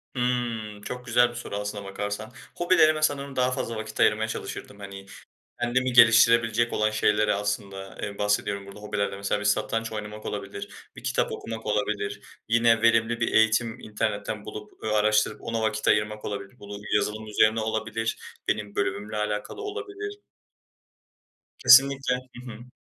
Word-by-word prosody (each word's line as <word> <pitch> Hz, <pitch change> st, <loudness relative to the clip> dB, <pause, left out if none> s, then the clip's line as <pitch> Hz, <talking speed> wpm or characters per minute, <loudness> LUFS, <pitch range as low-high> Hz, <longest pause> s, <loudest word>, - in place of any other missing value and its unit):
Hıı, 120 Hz, -4 st, -2 dB
çok 125 Hz, +3 st, -6 dB
güzel 120 Hz, 0 st, +4 dB
bir -, -, -10 dB
soru 120 Hz, -4 st, -6 dB
aslına 105 Hz, 0 st, -4 dB
bakarsan. 100 Hz, +3 st, -5 dB, 0.2 s
Hobilerime 160 Hz, -3 st, +4 dB
sanırım 140 Hz, -2 st, 0 dB
daha 125 Hz, 0 st, +2 dB
fazla 115 Hz, -2 st, -3 dB
vakit 110 Hz, 0 st, -6 dB
ayırmaya 110 Hz, +1 st, +3 dB
çalışırdım. 105 Hz, -2 st, -6 dB
Hani, 100 Hz, -1 st, -9 dB, 0.6 s
kendimi 125 Hz, +1 st, +1 dB
geliştirebilecek 115 Hz, 0 st, +6 dB
olan 110 Hz, 0 st, +2 dB
şeylere 105 Hz, 0 st, +2 dB
aslında, 100 Hz, -1 st, -4 dB
eee, 100 Hz, -1 st, -5 dB
bahsediyorum 105 Hz, -1 st, 0 dB
burada 100 Hz, +1 st, -11 dB
hobilerde. 105 Hz, -1 st, -2 dB
Mesela 100 Hz, +1 st, -1 dB
bir 105 Hz, -, -5 dB
satranç 115 Hz, +2 st, 0 dB
oynamak 105 Hz, 0 st, -6 dB
olabilir, 100 Hz, 0 st, -7 dB
bir -, -, -11 dB
kitap -, -, 0 dB
okumak 110 Hz, 0 st, -6 dB
olabilir, 105 Hz, -1 st, -1 dB, 0.3 s
yine 115 Hz, 0 st, +4 dB
verimli 115 Hz, 0 st, +3 dB
bir 120 Hz, -, 0 dB
eğitim 110 Hz, +1 st, +3 dB
internetten 105 Hz, -1 st, -3 dB
bulup, 105 Hz, 0 st, -10 dB
ııı, 110 Hz, -1 st, -1 dB
araştırıp 105 Hz, 0 st, +2 dB
ona 115 Hz, -1 st, -2 dB
vakit 110 Hz, -1 st, -1 dB
ayırmak 105 Hz, 0 st, +1 dB
olabilir. 100 Hz, -1 st, -6 dB
Bunu 100 Hz, 0 st, -8 dB, 0.2 s
yazılım 110 Hz, +1 st, -1 dB
üzerine 110 Hz, +1 st, +3 dB
olabilir, 110 Hz, +1 st, -2 dB, 0.3 s
benim 105 Hz, -1 st, -1 dB
bölümümle 105 Hz, +2 st, -2 dB
alakalı 105 Hz, -, -3 dB
olabilir. 410 Hz, 0 st, -6 dB, 1.4 s
Kesinlikle, 135 Hz, 0 st, +6 dB, 0.2 s
hı 125 Hz, -, -10 dB
hı. 120 Hz, +3 st, -12 dB
110 Hz, 145 wpm, -26 LUFS, 105-120 Hz, 1.4 s, geliştirebilecek